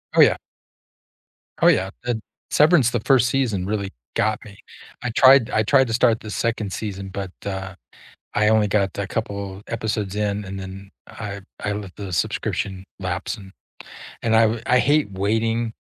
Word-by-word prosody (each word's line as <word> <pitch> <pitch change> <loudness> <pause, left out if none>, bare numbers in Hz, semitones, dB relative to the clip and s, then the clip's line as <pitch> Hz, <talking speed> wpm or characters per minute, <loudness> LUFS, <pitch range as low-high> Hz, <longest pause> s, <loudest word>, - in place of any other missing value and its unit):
Oh, - - +7
yeah. - - +6 1.2
Oh, - - +6
yeah, 95 +1 +4 0.2
eh 120 - +1 0.4
Severance, 150 -5 +5
the 120 - 0
1st 125 -2 +4
season 110 -9 0
really 100 -1 -2 0.2
got 110 0 +1
me, 100 -1 -13 0.5
I 125 - -1
tried 130 -1 +6
I 110 - +2
tried 130 +3 +4
to 115 - -3
start 115 -1 +3
the 110 - -7
2nd 110 -4 -1
season, 100 -2 -5
but, 95 -1 -5
uh, 95 -1 -4 0.6
I 105 0 +3
only 110 -2 +4
got 100 -2 +1
a 100 - -1
couple 100 -3 -4
episodes 105 -3 -2
in, 105 -1 -1
and 95 0 -6
then, 95 +1 -9 0.2
I 100 -3 -7 0.2
I 100 - -1
let 100 -3 -6
the 100 -3 -6
subscription 95 +3 -2
lapse, 95 +4 -3
and 95 -1 -12 0.7
and 110 -1 +3
I 110 0 +6
uh, 110 +1 -1
I 125 0 +4
hate 145 -6 +2
waiting 115 +4 0
105 Hz, 170 wpm, -22 LUFS, 95-115 Hz, 1.2 s, Oh